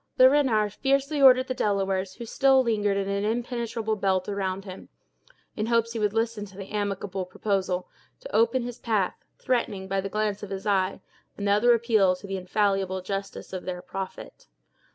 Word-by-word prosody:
Le 255 - +9
Renard 240 -8 +2
fiercely 275 +3 0
ordered 255 -1 +7
the 255 - -2
Delawares, 195 -4 -1
who 235 - -7
still 265 +3 +4
lingered 210 -4 +1
in 195 -1 -1
an 200 0 -1
impenetrable 230 -1 -2
belt 190 -2 0
around 195 -1 -3
him, 185 -1 -10 0.7
in 215 0 -2
hopes 230 0 +1
he 230 - -3
would 210 -1 +1
listen 225 -1 -1
to 195 -2 -11
the 195 -1 -8
amicable 200 -2 -2
proposal, 185 -1 -2 0.3
to - - -7
open 235 +2 +3
his 245 0 -6
path, 210 -5 0 0.2
threatening, 210 -6 -1
by 195 0 0
the 195 - -4
glance 210 0 -1
of 205 - -7
his 195 +1 -5
eye, 190 -3 +1 0.4
another 210 +4 +4
appeal 220 -5 +3
to 180 - -12
the 195 0 -4
infallible 190 0 0
justice 195 0 -5
of 185 - -5
their 180 -1 -4
"prophet." 190 +1 -7
205 Hz, 175 wpm, -26 LUFS, 195-230 Hz, 0.7 s, Le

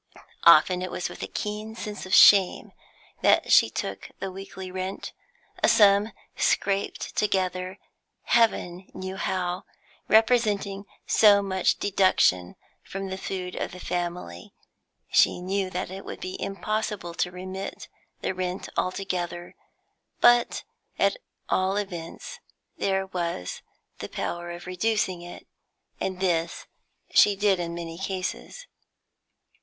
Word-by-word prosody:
Often 180 -1 +7
it 185 - -3
was 175 - -3
with - - -10
a - - -3
keen 215 +1 -5
sense 210 -3 -6
of 185 - +3
shame 195 -3 +6 0.5
that - - +3
she - - +7
took - - -5
the 195 - -5
weekly 190 0 -8
rent, 185 +1 -5 0.5
a - - +5
sum 205 +1 +5 0.2
scraped 195 0 0
together 185 -2 -1 0.5
Heaven 190 -6 +1
knew 185 0 -5
how, 185 -1 -2 0.4
representing 210 -3 +2 0.2
so 205 -2 +5
much 190 -2 +1
deduction 185 - +2 0.3
from 195 0 -6
the 190 - -4
food 180 -2 -4
of - - -4
the 180 - -9
family. 175 - -5 0.6
She - - +4
knew 190 +1 -1
that 180 0 -4
it 195 +1 -7
would - - -8
be 185 - -5
impossible 200 -3 -3
to 180 - -1
remit 185 +2 -7 0.3
the - - -1
rent 185 0 -4
altogether, 180 -2 -3 0.6
but 240 0 +4 0.3
at - - +3 0.3
all 190 +1 +1
events 175 -5 -6 0.4
there 190 0 0
was 170 - -4 0.4
the - - -6
power 175 0 -4
of 175 0 -8
reducing 185 -1 -1
it, 175 0 -10 0.5
and 185 -1 -3
this 170 -3 -1 0.5
she 205 - +6
did 195 -2 +2
in 170 -1 -3
many 165 0 -6
cases. 190 - -4
190 Hz, 125 wpm, -26 LUFS, 180-200 Hz, 0.6 s, Often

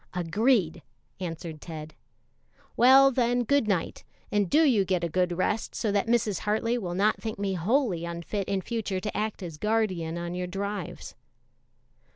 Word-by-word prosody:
"Agreed," 180 -1 +1 0.4
answered 165 -3 -6
Ted. 155 -2 -8 0.8
"Well, 265 +3 +7
then, 245 -1 +1
good 280 -1 +2
night, 190 -5 -1 0.3
and 205 -3 +1
do 315 +2 +5
you 240 -10 +4
get 185 -2 -1
a 170 - 0
good 180 +1 0
rest, 210 +4 -1
so 215 - -1
that 200 +2 +1
Mrs. 225 -4 +1
Hartley 220 +3 0
will 175 -5 -4
not 205 +3 +2
think 220 -1 -4
me 200 -1 -1
wholly 190 - +1
unfit 170 +4 -4
in 195 -1 -1
future 210 -2 -3
to 210 +2 -5
act 215 -2 -2
as 165 -4 -7
guardian 185 -6 0
on 170 0 -4
your 180 0 -3
drives." 200 -1 -5
200 Hz, 165 wpm, -27 LUFS, 175-225 Hz, 0.8 s, Well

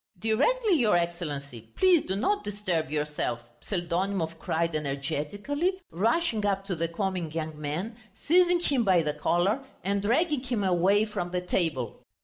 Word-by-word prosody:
"Directly, 370 - +2
your 215 -6 +4
Excellency; 150 -8 -3 0.2
please 365 -4 +5
do 190 - -2
not 405 - 0
disturb 185 -6 -2
yourself!" 150 -5 -2 0.2
Pseldonimov 175 -2 -2
cried 165 0 -1
energetically, 155 - -2 0.2
rushing 225 - +1
up 195 -1 0
to 190 - -2
the 165 +1 -1
comic 175 -2 -3
young 155 -2 -4
man, 170 +10 -3 0.3
seizing 350 +2 +4
him 275 -7 +2
by 185 -5 +4
the 150 -1 -1
collar 175 - +1 0.2
and 200 +1 0
dragging 285 - +2
him 245 -5 -2
away 190 +3 +3
from 180 -5 -4
the 180 0 -1
table. 160 - -2
190 Hz, 145 wpm, -28 LUFS, 160-225 Hz, 0.3 s, please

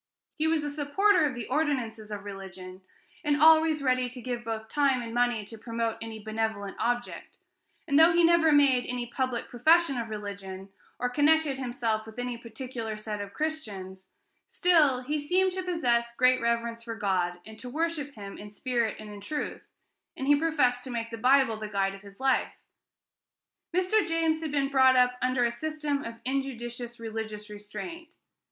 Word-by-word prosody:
He 315 +1 0
was 320 -2 +1
a 290 - -3
supporter 305 +6 +3
of 270 -4 -1
the 240 -2 -5
ordinances 255 -7 -1
of 205 -1 -6
religion, 190 -2 -9 0.4
and 295 0 +1
always 315 -1 +6
ready 255 -1 +2
to 250 +1 -9
give 245 0 -4
both 220 -1 -4
time 275 -1 +2
and 230 -1 -6
money 240 -3 +1
to 225 +1 -10
promote 230 0 -2
any 225 -1 -6
benevolent 220 -2 -3
object; 245 0 -2 0.5
and 285 -1 +4
though 325 +2 +8
he 340 +1 +4
had 340 0 +5
never 320 -1 +4
made 275 -4 +4
any 245 -1 -2
public 245 0 -2
profession 310 +2 +3
of 230 -1 -4
religion, 200 -2 -7 0.3
or 250 - 0
connected 290 +1 +2
himself 235 -4 -2
with 220 - -12
any 245 0 -3
particular 230 -1 -6
set 215 -1 -5
of 200 0 -8
Christians, 200 -12 -4 0.4
still 305 -8 +4
he 300 +4 -1
seemed 370 +6 +2
to 375 +1 -3
possess 240 -10 0
great 255 +1 +4
reverence 235 0 -1
for 230 -1 -6
God, 185 -4 0
and 220 +1 -11
to 250 - -7
worship 305 -1 -2
him 200 -2 -8
in 210 - -9
spirit 235 0 -1
and 215 -1 -9
in 205 - -10
truth, 300 +8 -4 0.6
and 265 - -3
he 290 +1 +6
professed 285 -6 +1
to - - -6
make 230 -1 -4
the 230 - -5
Bible 255 -2 +4
the 215 0 -5
guide 195 -1 0
of 195 - -11
his 200 -1 -15
life. 265 0 +1 1.2
Mr. 370 +3 +2
James 325 -1 +1
had 315 -2 -3
been 280 -1 +1
brought 260 -1 +5
up 250 0 +4
under 255 -1 +2
a 235 - +1
system 300 +2 -2
of 230 - -6
injudicious 240 -3 -4
religious 220 -2 -6
restraint. 330 - -8
245 Hz, 180 wpm, -28 LUFS, 220-290 Hz, 1.2 s, though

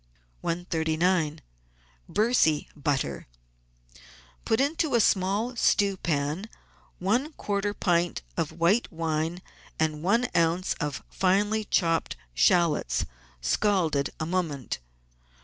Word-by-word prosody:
139— 165 -1 0 0.7
BERCY 210 -9 +2
BUTTER 135 - -2 1.2
Put 220 - +2
into 290 0 +1
a - - +5
small 205 +4 +2
stewpan 185 -4 +1 0.5
one 245 - 0
quarter 205 -3 -2
pint 175 - +1
of - - -1
white 175 +8 +2
wine 165 +1 -2 0.4
and 155 -1 0
one 230 +8 +2
oz. 170 +2 +2
of 145 -4 -3
finely 205 +3 +1
chopped 165 -5 +1 0.2
shallots, 165 - +2 0.4
scalded 160 - +1
a 155 - -1
moment. 160 -7 -2
175 Hz, 95 wpm, -27 LUFS, 155-205 Hz, 1.2 s, a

